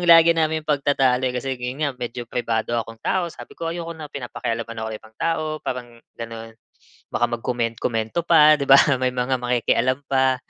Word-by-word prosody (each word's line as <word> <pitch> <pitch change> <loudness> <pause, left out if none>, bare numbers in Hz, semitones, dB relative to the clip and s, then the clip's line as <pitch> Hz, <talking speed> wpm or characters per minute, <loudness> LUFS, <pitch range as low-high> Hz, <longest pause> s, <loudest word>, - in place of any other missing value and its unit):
lagi 165 0 +8
naming 160 -1 0
pagtatalo 140 -3 +2
eh, 125 - -5
kasi 135 +2 -2
yun 125 +4 -4
nga 140 - 0
medyo 120 0 -5
pribado 115 -1 -2
akong 115 0 -4
tao 180 -2 +1
sabi - - -11
ko, 165 - -4
ayoko 170 0 -5
na 155 -2 -8
pinapakialaman 115 -3 -4 0.2
ako 110 - -3
ng 110 - -4
ibang 110 0 -19
tao 165 -1 0 0.2
parang 120 -2 -6 0.2
ganun. 115 -1 -8 0.6
Baka - - +1
mag-komen-komento 115 +1 -2
pa, 155 -2 +7
'di 140 - -1
ba, 135 - +10 0.2
may 130 - +2
mga 125 +1 0
makikialam 125 +1 +1
pa, 130 -1 +3
125 Hz, 175 wpm, -22 LUFS, 115-150 Hz, 0.6 s, ba